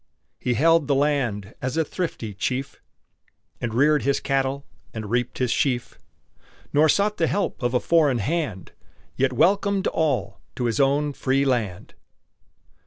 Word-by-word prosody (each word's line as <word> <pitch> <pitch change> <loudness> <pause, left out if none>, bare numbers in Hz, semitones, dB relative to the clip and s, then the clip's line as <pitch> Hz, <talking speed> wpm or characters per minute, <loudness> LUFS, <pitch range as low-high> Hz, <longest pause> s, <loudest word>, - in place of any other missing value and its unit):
He 125 - -1
held 165 +2 +4
the 140 - +2
land 130 -8 0
as 130 +3 -2
a 160 - +2
thrifty 145 - -4
chief, 125 +7 -3 0.8
And 120 - -2
reared 145 +5 +3
his 140 0 +1
cattle, 135 0 -1 0.3
and 110 -2 -5
reaped 120 0 -1
his 125 -3 0
sheaf, 130 -5 -1 0.7
Nor 155 +2 +4
sought 205 +4 +2
the 165 - +2
help 200 -6 -2
of 120 0 0
a - - +4
foreign 150 -6 +3
hand, 140 - -3 0.4
Yet 130 0 +1
welcomed 195 - +2
all 145 -10 -1
to 125 - -2
his 115 +1 0
own 145 +2 +2
free 135 +1 +1
land! 110 -8 -2
135 Hz, 150 wpm, -24 LUFS, 120-155 Hz, 0.8 s, held